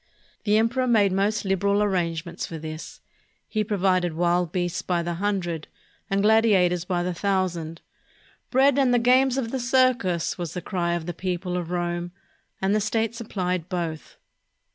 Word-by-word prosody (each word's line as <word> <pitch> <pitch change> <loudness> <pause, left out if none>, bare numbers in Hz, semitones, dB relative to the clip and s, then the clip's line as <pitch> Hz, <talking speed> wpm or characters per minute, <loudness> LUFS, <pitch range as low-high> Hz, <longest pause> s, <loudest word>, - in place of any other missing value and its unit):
The 210 0 +4
emperor 235 +4 +1
made 210 -5 +4
most 200 +3 0
lib 195 -1 +1
' - - -17
eral 200 +1 +2
arrangements 170 -3 -2
for 165 - -6
this. 155 0 -8 0.5
He 215 -1 -1
provided 185 -5 +1
wild 175 0 +1
beasts 175 -1 -1
by 175 -2 -1
the 175 0 -2
hundred 175 -4 -2 0.4
and 195 0 +1
gladiators 200 -6 +4
by 180 -1 -1
the 180 0 -2
thousand. 175 -3 -1 0.7
"Bread 275 +1 +4
and 250 -3 +4
the - - +5
games 255 +2 +4
of 235 -4 -2
the 265 - -2
circus!" 240 -9 +1
was 170 -1 -4
the - - -2
cry 175 -3 -1
of 170 -2 -4
the 175 - -4
people 180 0 -3
of 175 -2 -3
Rome, 175 0 -2 0.5
and 190 +1 +1
the 215 - +2
state 220 +1 0
supplied 185 -7 -3
both. 170 -4 -4
185 Hz, 170 wpm, -25 LUFS, 175-215 Hz, 0.7 s, the